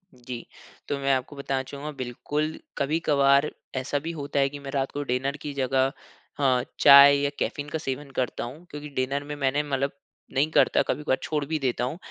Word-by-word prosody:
जी, 120 -1 -8 0.4
तो 145 - -1
मैं 135 0 +2
आपको 130 +3 -4
बताना 135 -1 -2
चाहूँगा 140 +3 -7
बिल्कुल 145 +5 -3 0.2
कभी-कभार 140 -1 +3 0.3
ऐसा 130 +2 -1
भी 165 +3 -4
होता 145 -3 -3
है 135 0 +3
कि 145 - -8
मैं 140 -1 -7
रात 135 -1 -1
को 145 - -3
डिनर 135 +2 -1
की 145 - -5
जगह 135 0 +1 0.5
हाँ 130 -3 +3 0.2
चाय 140 0 +9
या 145 0 +1
कैफ़ीन 145 0 -2
का 160 - -2
सेवन 140 -1 -4
करता 125 -2 -1
हूँ। 145 +9 -8
क्योंकि 150 0 -7
डिनर 135 +2 -1
में 145 0 -6
मैंने 140 +1 +1
मतलब 140 -1 -1 0.4
नहीं 145 +4 +2
करता - - +4
कभी-कभार 150 -3 0
छोड़ 150 -2 -1
भी 155 +2 -2
देता 125 -3 -1
हूँ। 130 +6 -2
140 Hz, 195 wpm, -26 LUFS, 130-145 Hz, 0.5 s, चाय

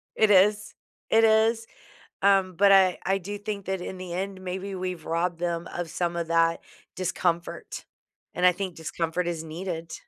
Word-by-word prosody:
It 220 - +3
is. 205 +2 +4 0.3
It 225 0 +4
is, 225 +1 +3 0.6
um, 195 -2 +3
but 200 +1 +5
I 190 -2 +5
I 195 +1 +2
do 200 +2 -6
think 205 -1 -5
that 190 0 -1
in 185 +1 -6
the 185 -1 -7
end, 190 +1 -4
maybe 190 +1 -5
we've 180 -3 -5
robbed 170 +1 -1
them 170 -1 -2
of 175 -2 -4
some 170 +1 -2
of 170 -1 -2
that 165 0 +2 0.4
discomfort. 175 -1 -2 0.5
And 180 - +1
I 180 - +8
think 185 -1 -5
discomfort 165 +2 -3
is 170 -2 -2
needed. 165 0 -6
185 Hz, 175 wpm, -26 LUFS, 170-195 Hz, 0.6 s, I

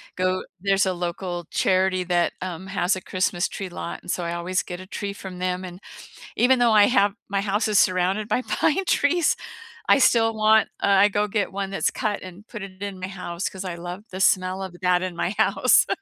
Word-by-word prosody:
go 185 0 0 0.2
there's 195 0 +2
a 185 - 0
local 175 0 -4
charity 185 -1 +1
that, 175 -1 +1
um, 185 0 -5
has 195 -1 0
a 185 - -6
Christmas 185 0 -1
tree 195 - -5
lot 175 -1 -6
and - - -12
so 175 - -1
I 170 - -3
always 175 +2 -1
get 180 0 -7
a 185 - -9
tree 200 0 -4
from 190 -2 -9
them, 185 0 -2
and 180 +2 -10 0.6
even 250 +1 +4
though 240 -1 +4
I 210 -1 +7
have 205 -4 +2
my 200 0 -1
house 205 +2 0
is 210 -1 +3
surrounded 185 +3 +1
by 240 +4 0
pine 325 +8 0
trees, 330 0 +2 0.5
I - - +7
still 225 -4 +3
want, 215 0 +4
uh, - - +1
I 200 0 +5
go 205 +1 0
get 205 0 -1
one 195 0 -4
that's 195 - +1
cut 210 -2 -2
and 185 +4 -11
put 215 - -8
it 190 0 -9
in 200 -2 -5
my 185 - -4
house 185 -1 -4
'cause 190 0 -8
I 180 - -3
love 175 +3 -7
the 185 +1 -5
smell 185 0 +2
of 190 -2 -6
that 180 0 +3
in 185 -2 -4
my 175 +2 -1
house. - - +4
190 Hz, 220 wpm, -24 LUFS, 180-205 Hz, 0.6 s, I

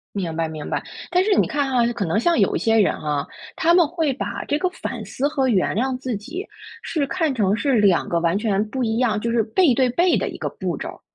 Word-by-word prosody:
明 175 -5 -3
白， 165 -1 -1
明 155 -2 -7
白。 - - -2 0.3
但 360 0 +3
是 420 - +3
你 - - +3
看 285 -2 -1
哈， 245 -2 +3
可 230 -4 -3
能 165 +4 0
像 335 +8 +2
有 - - +2
一 - - +1
些 225 0 +2
人 205 - +4
啊， 145 -2 -2 0.3
他 335 - +3
们 350 -3 +5
会 320 -3 -1
把 - - -4
这 290 - 0
个 365 - +1
反 370 - -6
思 280 +3 -1
和 275 -4 0
原 195 -6 +1
谅 255 +3 0
自 255 -4 -3
己 300 - -6 0.4
是 295 -4 -1
看 320 0 0
成 205 -5 +2
是 275 +1 +1
两 195 -4 +3
个 170 - +1
完 170 +2 +1
全 205 -1 +1
不 260 +2 -2
一 225 -1 0
样 220 -4 +1
就 235 - -2
是 230 -1 +2
背 260 - +3
对 255 0 +2
背 345 +8 +3
的 - - -1
一 - - -8
个 - - -2
步 - - -4
骤 - - -5
儿。 - - -11
245 Hz, 280 characters per minute, -22 LUFS, 205-295 Hz, 0.4 s, 们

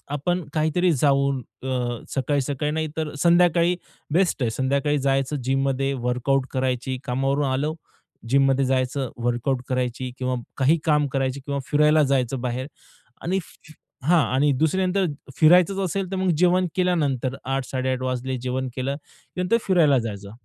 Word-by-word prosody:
आपण 175 +5 -1
काहीतरी 160 +3 +2
जाऊन 140 -2 +2 0.2
अ, 125 -3 -2 0.2
सकाळी-सकाळी 145 +1 -1
नाही 155 0 -1
तर 155 -2 -2
संध्याकाळी 175 0 +4 0.4
बेस्ट 175 -7 +2
आहे. 115 - +1
संध्याकाळी 140 +4 0
जायचं 135 +1 0
जिममध्ये 135 +1 0
वर्कआउट 130 +2 +1
करायची, 130 0 -1
कामावरून 135 +2 0
आलो, 150 +4 -1 0.5
जिममध्ये 135 0 +3
जायचं, 130 0 0 0.2
वर्कआउट 120 +2 0
करायची 125 0 -2
किंवा 130 0 -1 0.2
काही 145 +5 +3
काम 150 -2 +3
करायची 135 0 -1
किंवा 140 0 -3
फिरायला 150 +1 +4
जायचं 130 -2 0
बाहेर 125 +2 -3 0.5
आणि 185 +3 0 0.6
हां 170 +5 +4 0.2
आणि 145 +2 +3
दुसऱ्या 185 +4 +2
नंतर 190 +1 +1 0.3
फिरायच 175 +3 +6
असेल, 195 -1 -2
तर 195 - -2
मग 185 -1 +1
जेवण 180 +1 +3
केल्यानंतर. 145 -9 0
8.00-8.30 130 -1 -2
वाजले 130 0 -2
जेवण 130 +1 -2
केलं, 135 +2 -2 0.4
नंतर 180 +6 +2
फिरायला 165 -9 +4
जायचं 100 -2 -6
140 Hz, 140 wpm, -23 LUFS, 130-160 Hz, 0.6 s, फिरायच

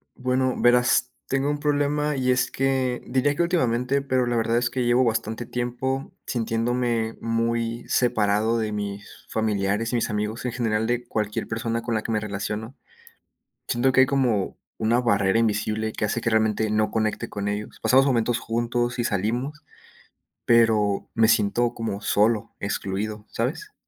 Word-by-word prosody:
Bueno, 130 0 0
verás, 125 0 +4 0.2
tengo 135 +1 0
un 145 - -1
problema, 145 0 0
y 130 -1 +1
es 125 - +1
que 130 -2 0
diría 130 +3 +1
que 160 - +1
últimamente, 135 -5 +1
pero 130 -2 +1
la 120 0 0
verdad 115 +1 +2
es 120 0 +1
que 125 0 -1
llevo 120 +2 +4
bastante 115 0 -2
tiempo 125 +2 -3
sintiéndome 115 0 -1
muy 115 0 -1
separado 110 -2 +2
de 110 -1 -2
mis 100 -1 -4 0.2
familiares 105 +1 0
y - - +2
mis 115 - -1
amigos, 105 +3 -3
en 125 - -2
general 110 -3 0
de 120 0 -1
cualquier 105 -2 -2
persona 115 0 -2
con 115 -1 -2
la 110 - 0
que 115 - -3
me 110 - +1
relaciono. 105 +4 -4 0.9
Siento 120 +2 +2
que 130 0 +5
hay - - +6
como 130 -8 0 0.2
una 115 +3 +2
barrera 100 -2 +2
invisible 110 0 0
que - - -1
hace 115 +3 -2
que 115 - 0
realmente 110 -1 +1
no 105 0 +1
conecte 110 -1 -1
con 100 0 -4
ellos. 105 +1 -4
Pasamos 135 +1 +5
momentos 120 -3 +1
juntos 120 +2 -1
y - - +1
salimos, 120 - -2 0.8
pero 110 -4 +3
me 110 -1 +4
siento 115 +2 +2
como 110 -4 -4
solo, 110 +1 +1
excluido, 105 +1 -3
¿sabes? 145 - -3
115 Hz, 165 wpm, -24 LUFS, 110-125 Hz, 0.9 s, hay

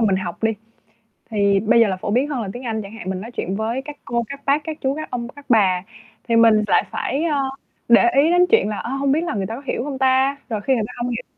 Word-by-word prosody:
mình 195 -2 +2
học 175 -1 -5
đi. 225 0 +2 0.8
Thì 200 -3 +2
bây 220 +3 +3
giờ 230 - +5
là 190 -2 -2
phổ 195 - -4
biến 255 +6 +1
hơn 270 -5 -2
là 205 - -4
tiếng 245 - -8
Anh 220 -2 -2
chẳng 200 -1 -9
hạn, 225 -5 -7
mình 185 0 -3
nói 230 - -8
chuyện 195 -5 -3
với 225 +5 -2
các 295 -1 -8
cô, 235 +1 -1
các 280 0 -7
bác, 285 +2 +2
các 315 -1 -5
chú, 270 0 0
các 310 +1 -6
ông, 240 -1 -3
các 285 +2 -14
bà 190 -6 +3 0.4
thì 230 - +2
mình 225 -2 +5
lại - - +3
phải, 280 +4 -2
ờ, 300 -4 +1 0.5
để 235 0 +6
ý 315 +3 +3
đến 355 +1 +5
chuyện 450 - +4
là, 210 - -3
ờ, - - -5
hông 275 0 0
biết 305 +4 +2
là 345 - -2
người 195 - -1
ta 225 - -5
có 260 - -8
hiểu 245 - -2
hông 275 -1 -4
ta? 265 +1 +3
Rồi 215 -3 -2
khi 265 - +1
người 225 - 0
ta - - -11
hông 240 0 -2
hiểu 240 +1 -4
235 Hz, 290 wpm, -21 LUFS, 215-275 Hz, 0.8 s, để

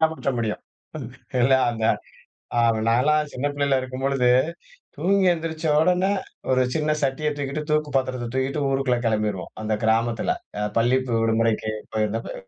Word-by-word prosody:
காமிச்ச 160 -3 +1
முடியும். 110 -2 -2 0.8
இல்ல, 130 +2 +4 0.2
அந்த 115 -2 -3 0.7
அ - - +3 0.3
நான் 115 +1 +4
எல்லாம் 150 +1 +2
சின்ன 130 +3 -2
பிள்ளையா 140 -2 +2
இருக்கும் 130 0 -6
பொழுது, 135 -3 +2 0.7
தூங்கி 195 +1 +2
எந்திரிச்ச 160 -1 -4
உடனே 180 +3 +3 0.4
ஒரு 130 0 +4
சின்ன 155 -1 0
சட்டிய 140 +2 0
தூக்கிட்டு, 145 +1 -3
தூக்கு 150 -1 +1
பாத்திரத்தை 130 -2 -1
தூக்கிட்டு 130 +3 -1
ஊருக்குள்ள 135 -2 +1
கிளம்பிருவோம், 105 -4 -1
அந்த 110 0 -2
கிராமத்துல, 115 +1 +1 0.3
அ - - -1 0.2
பள்ளி 120 +3 +3 0.2
விடுமுறைக்கு 115 -1 +1 0.2
போயிருந்தப்ப. 110 +1 -1
130 Hz, 140 wpm, -24 LUFS, 115-150 Hz, 0.8 s, இல்ல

